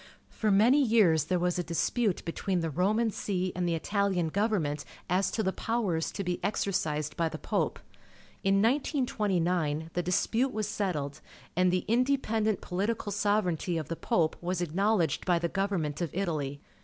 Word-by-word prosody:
For 220 Hz, -, -1 dB
many 225 Hz, +8 st, +5 dB
years 195 Hz, -, +4 dB
there 180 Hz, +3 st, +1 dB
was 180 Hz, 0 st, 0 dB
a -, -, 0 dB
dispute 190 Hz, +5 st, 0 dB
between 180 Hz, +2 st, -1 dB
the 165 Hz, -1 st, -2 dB
Roman 215 Hz, +8 st, +1 dB
See 185 Hz, -3 st, -2 dB
and 180 Hz, 0 st, -1 dB
the 165 Hz, -, +1 dB
Itahan 190 Hz, -3 st, 0 dB
government 180 Hz, -9 st, 0 dB, 0.2 s
as 185 Hz, +2 st, +2 dB
to 220 Hz, -, -1 dB
the 190 Hz, -, 0 dB
powers 205 Hz, -9 st, -1 dB
to 200 Hz, -, -3 dB
be 180 Hz, -1 st, -2 dB
exercised 160 Hz, -7 st, -1 dB
by 165 Hz, -2 st, 0 dB
the -, -, -6 dB
Pope. -, -, -1 dB, 0.7 s
In 195 Hz, +1 st, +3 dB
1929, 185 Hz, -, 0 dB
the 175 Hz, -, 0 dB
dispute 220 Hz, +8 st, +1 dB
was 215 Hz, -1 st, -1 dB
settled, 180 Hz, -10 st, -2 dB, 0.3 s
and 180 Hz, +1 st, +3 dB
the 180 Hz, 0 st, 0 dB
independent 225 Hz, -4 st, +1 dB
political 205 Hz, +3 st, -2 dB
sovereignty 200 Hz, -4 st, 0 dB
of 155 Hz, -4 st, -4 dB
the 165 Hz, -, -2 dB
Pope 160 Hz, -1 st, +1 dB
was 180 Hz, +1 st, -2 dB
ac 175 Hz, -3 st, -2 dB
knowledged 195 Hz, -2 st, +2 dB
by 180 Hz, -2 st, +2 dB
the 170 Hz, 0 st, 0 dB
government 180 Hz, -6 st, -1 dB
of 170 Hz, -, -1 dB
Italy. 150 Hz, -7 st, -2 dB
185 Hz, 165 wpm, -29 LUFS, 165-210 Hz, 0.7 s, many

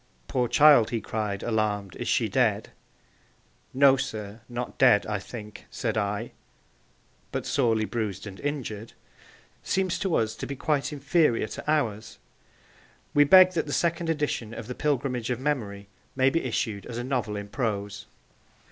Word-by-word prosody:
'Poor 125 Hz, -1 st, 0 dB
child,' 145 Hz, -5 st, +6 dB
he 115 Hz, -1 st, -1 dB
cried, 105 Hz, -2 st, -3 dB
alarmed, 105 Hz, -4 st, -1 dB
'is -, -, -5 dB
she -, -, +2 dB
dead?' -, -, +1 dB, 1.0 s
'No, 135 Hz, 0 st, +5 dB
sir; 110 Hz, -2 st, -5 dB
not 120 Hz, 0 st, -5 dB
dead, 125 Hz, -6 st, +5 dB
I 105 Hz, -2 st, -2 dB
think,' 105 Hz, 0 st, -10 dB
said 115 Hz, -4 st, -3 dB
I, 105 Hz, +1 st, -2 dB, 1.0 s
'But -, -, -3 dB
sorely 115 Hz, -5 st, +1 dB
bruised 105 Hz, -4 st, -3 dB
and 95 Hz, -2 st, -9 dB
injured,' 120 Hz, -7 st, -4 dB, 0.7 s
seems 190 Hz, -2 st, -1 dB
to 190 Hz, -5 st, 0 dB
us 110 Hz, 0 st, 0 dB
to -, -, -5 dB
be 140 Hz, -, -5 dB
quite 145 Hz, +1 st, -1 dB
inferior 145 Hz, -4 st, +2 dB
to -, -, -7 dB
ours. 110 Hz, -8 st, -1 dB, 1.0 s
We 145 Hz, 0 st, +6 dB
beg 185 Hz, +4 st, +8 dB
that 165 Hz, -4 st, -2 dB
the 145 Hz, -, -3 dB
second 170 Hz, -1 st, 0 dB
edition 145 Hz, -8 st, -2 dB
of 115 Hz, -, -7 dB
The 125 Hz, -, -5 dB
Pilgrimage 130 Hz, -4 st, -1 dB
of 125 Hz, -, -1 dB
Memory 110 Hz, -8 st, -3 dB, 0.3 s
may 130 Hz, 0 st, +3 dB
be 165 Hz, -, -1 dB
issued 110 Hz, -4 st, -2 dB
as 120 Hz, -, -6 dB
a 120 Hz, -, -3 dB
novel 125 Hz, -5 st, -2 dB
in 100 Hz, 0 st, -5 dB
prose. 105 Hz, -4 st, -3 dB
120 Hz, 155 wpm, -26 LUFS, 105-140 Hz, 1.0 s, beg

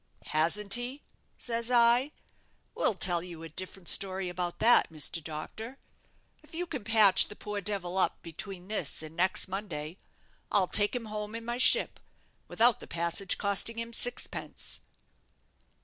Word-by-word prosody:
'Hasn't 195 Hz, +6 st, +1 dB
he?' 245 Hz, +4 st, 0 dB, 0.3 s
says 235 Hz, -1 st, -1 dB
I; 240 Hz, +3 st, +4 dB, 0.6 s
'we'll 215 Hz, -, +1 dB
tell 175 Hz, -2 st, +3 dB
you 170 Hz, -2 st, -10 dB
a 165 Hz, -, -9 dB
different 185 Hz, +2 st, -7 dB
story 190 Hz, -1 st, +1 dB
about 175 Hz, 0 st, -4 dB
that, 235 Hz, -6 st, +4 dB
Mr. 160 Hz, +1 st, -2 dB
Doctor. 215 Hz, -, -8 dB, 0.6 s
If 310 Hz, +1 st, -15 dB
you 355 Hz, +2 st, -2 dB
can 280 Hz, -9 st, -6 dB
patch 215 Hz, -3 st, +6 dB
the 210 Hz, -, -11 dB
poor 210 Hz, -1 st, -6 dB
devil 190 Hz, -2 st, -2 dB
up -, -, 0 dB
between 180 Hz, +2 st, -6 dB
this 185 Hz, -8 st, -3 dB
and 155 Hz, +1 st, -10 dB
next 185 Hz, +2 st, 0 dB
Monday, 180 Hz, -4 st, -6 dB, 0.5 s
I'll 200 Hz, -2 st, +3 dB
take 205 Hz, +5 st, +4 dB
him 240 Hz, -2 st, -4 dB
home 210 Hz, 0 st, -6 dB
in 230 Hz, 0 st, -7 dB
my 240 Hz, +1 st, -4 dB
ship, 485 Hz, -, +5 dB, 0.5 s
without 235 Hz, 0 st, +2 dB
the -, -, -9 dB
passage 170 Hz, +3 st, 0 dB
costing 200 Hz, +3 st, +1 dB
him 230 Hz, 0 st, -6 dB
sixpence.' 245 Hz, +1 st, -1 dB
200 Hz, 150 wpm, -29 LUFS, 175-230 Hz, 0.6 s, patch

